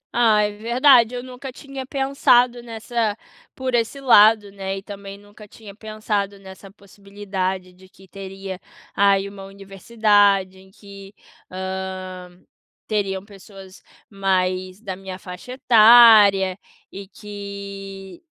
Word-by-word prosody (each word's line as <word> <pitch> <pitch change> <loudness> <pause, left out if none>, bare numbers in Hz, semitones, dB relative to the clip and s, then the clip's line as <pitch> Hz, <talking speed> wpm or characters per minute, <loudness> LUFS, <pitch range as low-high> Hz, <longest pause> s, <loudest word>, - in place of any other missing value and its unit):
Ah, 220 -3 +3
é 210 - -1
verdade. 235 +3 +3
Eu 245 - -6
nunca 255 +1 -9
tinha 270 0 -9
pensado 250 -3 +2
nessa 225 -2 -3 0.4
por 260 -1 -4
esse 235 +4 -1
lado, 215 -5 +5
né, 195 -1 -5
e 195 - -9
também 200 -1 -10
nunca 205 +1 -16
tinha 205 -1 -14
pensado 210 -2 -4
nessa 195 0 -13
possibilidade 195 -2 -6
de 185 +1 -20
que 190 0 -20
teria 195 0 -9 0.4
aí 200 -1 +2
uma 200 -1 -11
universidade, 195 -1 0
em 190 0 -19
que, 200 0 -14 0.4
hã, 185 -1 -6 0.6
teriam 195 -3 -3
pessoas 195 -2 -15 0.3
mais 185 -1 -2
da 195 -4 -6
minha 190 -1 -9
faixa 185 +7 -10
etária, 215 -6 +6 0.3
e 195 0 -10
que 200 - -10
200 Hz, 120 wpm, -21 LUFS, 190-220 Hz, 0.6 s, etária